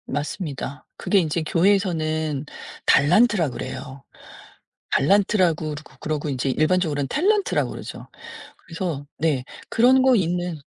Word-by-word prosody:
맞습니다. 145 -1 -5
그게 200 - +2
인제 165 -1 -1
교회에서는 160 -5 0 0.4
달란트라 180 +2 +4
그래요. 130 +2 -7 0.9
달란트라고 185 -1 +2
그러고 150 +2 -12
그러고 155 -1 -3
인제 135 0 -1
일반적으로는 155 -2 +1
탤런트라 400 - +1
그러죠. - - -8 0.5
그래서 165 -4 -5
네 145 -5 0 0.2
그런 255 +3 +4
거 260 -1 +5
있는 175 -4 -1
165 Hz, 305 characters per minute, -23 LUFS, 145-190 Hz, 0.9 s, 거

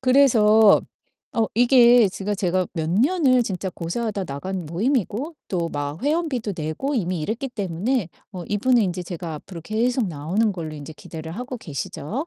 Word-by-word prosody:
그래서 225 -5 +6 0.5
어 225 -1 +1
이게 240 -2 +6
제가 195 +2 -3
제가 185 -2 0
몇 160 -3 -2
년을 255 - +3
진짜 190 -2 -3
고사하다 200 +4 -3
나간 180 +5 -5
모임이고 235 - -1
또 170 -3 -1
막 145 +1 -4
회원비도 285 - -1
내고 160 - -3
이미 180 - -1
이랬기 225 - -3
때문에 205 0 -1 0.2
어 180 -3 -6
이분은 235 +4 +3
인제 180 -2 -2
제가 170 -2 -6
앞으로 170 +3 -9
계속 230 +6 0
나오는 175 +8 0
걸로 160 -4 -6
인제 150 +1 -9
기대를 160 +1 -8
하고 250 +5 -6
계시죠. 195 - -5
205 Hz, 340 characters per minute, -23 LUFS, 170-245 Hz, 0.5 s, 그래서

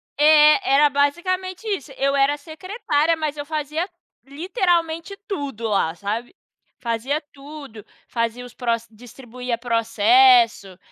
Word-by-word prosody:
É, 300 +2 +5
era 290 +1 +5
basicamente 365 +8 -1
isso, 375 -9 -3
eu 275 +1 0
era 280 +1 +2
secretária, 330 0 -1
mas 305 -2 -3
eu 290 - -5
fazia 310 +3 -3 0.4
literalmente 335 - -1
tudo 275 - -4
lá, 195 -6 +1
sabe, 220 - -5 0.4
fazia 245 +5 -2
tudo, 280 -6 -11 0.2
fazia 230 +1 -3
os 245 - -13
pro 245 -2 -2 0.2
distribuía 245 +1 -7
processo, 235 - +3
285 Hz, 115 wpm, -22 LUFS, 245-335 Hz, 0.4 s, É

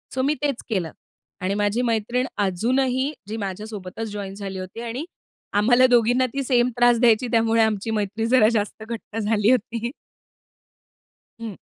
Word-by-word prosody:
So 260 - +1
मी 285 +3 +2
तेच 280 -4 -1
केलं. 180 -7 -1 0.5
आणि 190 +2 0
माझी 205 +3 +1
मैत्रीण 240 +2 0
अजूनही 255 +8 +1 0.2
जी 220 +1 -4
माझ्यासोबतच 210 +1 -5
जॉइन 200 -2 -5
झाली 195 -2 -6
होती 185 +5 -7
आणि 240 +7 -4 0.5
आम्हाला 245 +4 +5
दोघींना 245 +1 +3
ती 275 0 -1
सेम 245 -1 +2
त्रास 240 -1 +5
द्यायची, 240 0 +4
त्यामुळे 225 0 +3
आमची 220 0 0
मैत्रीण 215 +1 -1
जरा 245 -4 +5
जास्त 215 0 -2
घट्ट 225 -1 -7
झाली 210 +1 +2
होती. 235 0 -1 1.5
हं. 220 -4 -6
225 Hz, 150 wpm, -23 LUFS, 205-245 Hz, 1.5 s, आम्हाला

